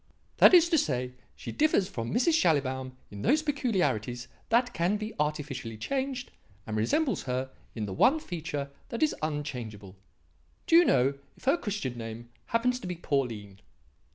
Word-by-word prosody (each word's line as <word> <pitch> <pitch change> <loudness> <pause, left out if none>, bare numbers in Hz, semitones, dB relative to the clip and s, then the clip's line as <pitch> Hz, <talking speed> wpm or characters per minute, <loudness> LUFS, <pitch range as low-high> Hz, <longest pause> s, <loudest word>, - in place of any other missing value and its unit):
"That - - +8
is 345 -1 +7
to 325 -3 +4
say 125 - -1
that 125 - -22 0.2
she - - -7
differs 295 -11 +2
from 115 - -5
Mrs. 260 - +3
Schallibaum 130 - +1 0.2
in 100 -1 -8
those 305 - +3
peculiarities 185 - 0 0.2
that 245 +2 +3
can 180 +5 +1
be 215 +1 -5
artificially 145 -6 -2
changed 265 - -3 0.3
and 110 - -4
resembles 210 - +1
her 130 +1 -2 0.2
in 110 -2 -2
the 95 - -5
one 270 - +4
feature 160 - -5 0.2
that 235 - -1
is 310 - +3
unchangeable. 125 -10 -4 0.7
Do 330 - +4
you 345 +1 +8
know 135 - +2 0.2
if - - -20
her 270 +5 +4
Christian 200 - -4
name 115 +1 -7 0.2
happens 250 +2 +1
to 215 - -7
be 180 - -3
Pauline?" 115 - -2
150 Hz, 165 wpm, -29 LUFS, -, 0.7 s, That